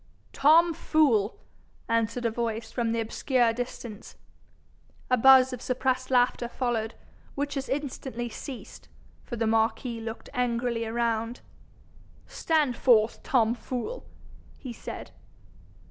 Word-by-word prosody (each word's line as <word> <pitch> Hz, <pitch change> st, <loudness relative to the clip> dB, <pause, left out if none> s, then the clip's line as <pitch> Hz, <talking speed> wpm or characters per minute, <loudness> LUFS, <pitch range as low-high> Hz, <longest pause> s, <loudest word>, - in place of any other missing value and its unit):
'Tom 330 Hz, +4 st, +5 dB
Fool,' 265 Hz, -11 st, +2 dB, 0.5 s
answered 230 Hz, +1 st, 0 dB
a 230 Hz, -, +2 dB
voice 225 Hz, -1 st, -3 dB
from 230 Hz, -1 st, -1 dB
the 230 Hz, -, 0 dB
obscure 235 Hz, +1 st, +1 dB
distance. 235 Hz, -2 st, -7 dB, 1.0 s
A -, -, +7 dB
buzz 260 Hz, +1 st, +7 dB
of 250 Hz, -, -6 dB
suppressed 255 Hz, 0 st, -1 dB
laughter 245 Hz, -1 st, +2 dB
followed, 235 Hz, -3 st, -2 dB, 0.4 s
which 285 Hz, +1 st, -2 dB
as 270 Hz, -1 st, -4 dB
instantly 265 Hz, -3 st, -3 dB
ceased, 250 Hz, +2 st, -9 dB, 0.3 s
for 240 Hz, -, -6 dB
the 230 Hz, -1 st, -1 dB
marquis 225 Hz, +1 st, 0 dB
looked 225 Hz, 0 st, -7 dB
angrily 235 Hz, -1 st, -1 dB
around. 230 Hz, 0 st, -1 dB, 0.8 s
'Stand 300 Hz, -6 st, 0 dB
forth, 230 Hz, -3 st, +3 dB
Tom 230 Hz, -3 st, +2 dB
Fool,' 255 Hz, -, -5 dB, 0.5 s
he 255 Hz, -3 st, -7 dB
said. -, -, -8 dB
240 Hz, 115 wpm, -27 LUFS, 230-260 Hz, 1.0 s, A